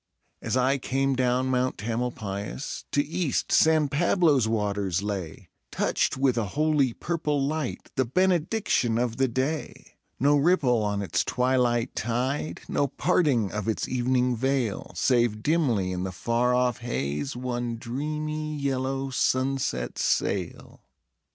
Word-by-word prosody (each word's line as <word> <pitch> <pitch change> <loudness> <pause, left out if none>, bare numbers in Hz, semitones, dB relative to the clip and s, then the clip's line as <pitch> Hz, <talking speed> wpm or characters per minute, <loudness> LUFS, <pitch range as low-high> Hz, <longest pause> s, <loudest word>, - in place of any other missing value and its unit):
As - - -1
I 130 +2 +2
came 135 +1 0
down 130 0 +1
Mount 130 0 0
Tamalpais 110 0 -4
To 145 - +2
east 160 -2 -1
San 155 -2 +4
Pablo's 150 - +3
water 105 -3 -1
lay, 95 -4 -5 0.2
Touched - - 0
with 130 -3 +2
a - - 0
holy 150 -4 +3
purple 150 +1 -2
light, 155 +2 -3
The 130 - +2
benediction 175 - +1
of 120 -1 -1
the 135 0 +3
day; 130 +6 -4 0.2
No 145 +3 +4
ripple 140 -7 +3
on 105 -1 -1
its 95 - 0
twilight 125 -1 +1
tide, 125 +6 -2
No 140 - +1
parting 140 - +1
of 105 0 -4
its 110 - -1
evening 125 0 +1
veil, 130 -3 -1
Save 120 -4 +1
dimly 125 - +1
in 90 -1 -3
the 95 0 -3
far 115 +7 +1
off 125 -2 +1
haze 75 - -3
One 120 -1 -3
dreamy, 155 +5 -3
yellow 135 -1 -2
sunset 130 +1 0
sail. - - -1
130 Hz, 130 wpm, -26 LUFS, 115-145 Hz, 0.2 s, San